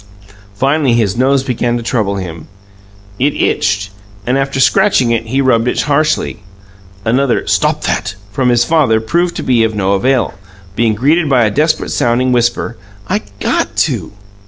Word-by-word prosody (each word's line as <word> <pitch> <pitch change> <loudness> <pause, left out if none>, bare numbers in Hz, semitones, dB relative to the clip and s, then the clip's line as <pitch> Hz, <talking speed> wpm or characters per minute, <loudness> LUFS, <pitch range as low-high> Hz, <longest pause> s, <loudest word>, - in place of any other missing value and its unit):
Finally, 135 +3 +1
his 110 -4 +1
nose 135 +2 +2
began 120 -2 -1
to 120 - -5
trouble 110 -4 -1
him. 85 -4 -7 0.7
It 145 +3 +1
itched, 100 +1 0 0.3
and 125 - 0
after 135 0 -1
scratching 190 - +3
it, 115 -1 -1
he 135 +4 0
rubbed 120 -3 +2
it - - 0
harshly. 150 -2 0 0.7
Another 125 +2 +1
"Stop - - 0
that!" 95 - -2 0.2
from 125 +4 0
his 120 -1 +3
father 135 -7 +2
proved 170 +10 -1
of 115 -3 +1
no 100 -1 0
avail, 125 +5 +1 0.4
being 115 -1 +1
greeted 150 +7 +2
by 125 -3 +4
a 105 - +1
desperate 155 +6 0
sounding 125 +2 +1
whisper, 120 -1 0 0.3
"I 105 - 0 0.2
GOT - - -1
to!" - - -1
120 Hz, 155 wpm, -14 LUFS, 110-135 Hz, 0.7 s, by